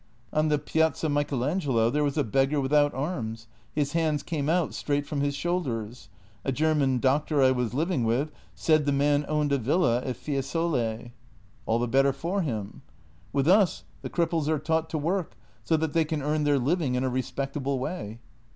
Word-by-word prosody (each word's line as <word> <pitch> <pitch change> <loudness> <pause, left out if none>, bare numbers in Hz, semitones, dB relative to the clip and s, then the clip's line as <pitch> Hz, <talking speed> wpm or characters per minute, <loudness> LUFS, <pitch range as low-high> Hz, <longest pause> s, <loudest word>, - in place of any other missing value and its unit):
" 120 - -33
On 155 +1 +2
the 150 -1 +2
Piazza 160 +1 0
Michelangelo 140 -3 +1
there 150 +2 +1
was 145 +1 -1
a 145 - +3
beggar 135 +5 +1
without 145 +2 +3
arms; 120 -7 -4 0.3
his 145 -2 -1
hands 155 -3 +1
came 150 -3 -2
out 170 -2 +1
straight 145 -1 -1
from 145 0 -3
the 145 0 +1
shoulders. 125 - -3 0.3
A 135 - 0
German 145 -2 +2
doctor 140 +3 +2
I 130 - +6
was 125 -2 -1
living 160 -3 0
with 125 +7 0 0.2
said 155 -2 +2
the - - +3
man 145 +1 +2
owned 150 -1 0
a 140 - +2
villa 125 -1 +2
at 130 - -3
Fiesole." 135 -5 -2 0.3
" 95 -1 -31
All 115 - +2
the 120 +1 0
better 135 +3 +3
for 170 +8 -2
him! 110 - -4 0.2
" - - -30
" - - -30
With 140 0 +1
us 190 0 +4 0.2
the - - -5
cripples 165 -3 0
are 155 0 +2
taught 160 +2 -1
to 160 - -2
work 170 +4 -1 0.3
so 160 - +2
that 160 -1 -2
they 165 - +3
can 155 -2 -3
earn 150 +1 0
their 145 -1 +3
living 140 0 0
in 125 - 0
a - - +1
respectable 135 +2 -2
way." 125 - -4
145 Hz, 195 wpm, -27 LUFS, 130-155 Hz, 0.3 s, I